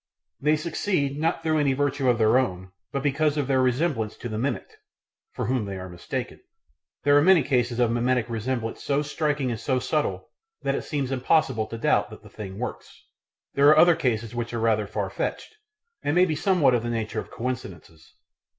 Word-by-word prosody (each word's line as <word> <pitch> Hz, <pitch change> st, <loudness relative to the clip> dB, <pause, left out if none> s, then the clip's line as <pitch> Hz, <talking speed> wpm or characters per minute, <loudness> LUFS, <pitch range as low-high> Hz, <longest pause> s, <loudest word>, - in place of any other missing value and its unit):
They 150 Hz, +2 st, +3 dB
succeed, 155 Hz, -2 st, -1 dB
not 165 Hz, +1 st, 0 dB
through 155 Hz, -1 st, +2 dB
any 140 Hz, -2 st, +2 dB
virtue 140 Hz, -1 st, 0 dB
of 120 Hz, -, +3 dB
their 110 Hz, +3 st, +4 dB
own, 95 Hz, -7 st, -3 dB, 0.2 s
but 140 Hz, -1 st, -2 dB
because 150 Hz, +1 st, +1 dB
of 145 Hz, -, +1 dB
their 130 Hz, -1 st, +2 dB
resemblance 130 Hz, -3 st, 0 dB
to 120 Hz, -, -6 dB
the 110 Hz, 0 st, -3 dB
mimicked, 140 Hz, -, -3 dB, 0.6 s
for -, -, -3 dB
whom 125 Hz, -4 st, 0 dB
they 100 Hz, -1 st, -5 dB
are 95 Hz, 0 st, -7 dB
mistaken. 90 Hz, -1 st, -5 dB, 0.6 s
There 145 Hz, +2 st, +5 dB
are 145 Hz, -, +6 dB
many 180 Hz, -1 st, +5 dB
cases 125 Hz, -3 st, 0 dB
of 120 Hz, -2 st, +3 dB
mimetic 120 Hz, 0 st, +1 dB
resemblance 115 Hz, 0 st, -3 dB
so 145 Hz, +1 st, +1 dB
striking 145 Hz, -3 st, -1 dB
and 115 Hz, -, -4 dB
so 130 Hz, +2 st, 0 dB
subtle 145 Hz, +4 st, -2 dB, 0.3 s
that -, -, +1 dB
it -, -, -2 dB
seems 140 Hz, -4 st, -2 dB
impossible 130 Hz, -3 st, +1 dB
to 115 Hz, -, -6 dB
doubt 115 Hz, -, +2 dB
that -, -, -12 dB
the -, -, -13 dB
thing 95 Hz, -2 st, -8 dB
works; 125 Hz, +3 st, -7 dB, 0.5 s
there 140 Hz, +1 st, +4 dB
are 155 Hz, -, +6 dB
other 170 Hz, +1 st, +7 dB
cases 115 Hz, -8 st, -1 dB
which 120 Hz, 0 st, -4 dB
are -, -, -1 dB
rather 110 Hz, -2 st, +1 dB
far -, -, -3 dB
fetched, -, -, -4 dB, 0.5 s
and 145 Hz, -, -1 dB
may 180 Hz, +1 st, +6 dB
be 160 Hz, -4 st, -1 dB
somewhat 155 Hz, -5 st, +3 dB
of 120 Hz, -, +2 dB
the 120 Hz, -, -4 dB
nature 115 Hz, -2 st, -2 dB
of -, -, -7 dB
coincidences. 90 Hz, -10 st, -7 dB
130 Hz, 200 wpm, -25 LUFS, 115-150 Hz, 0.6 s, other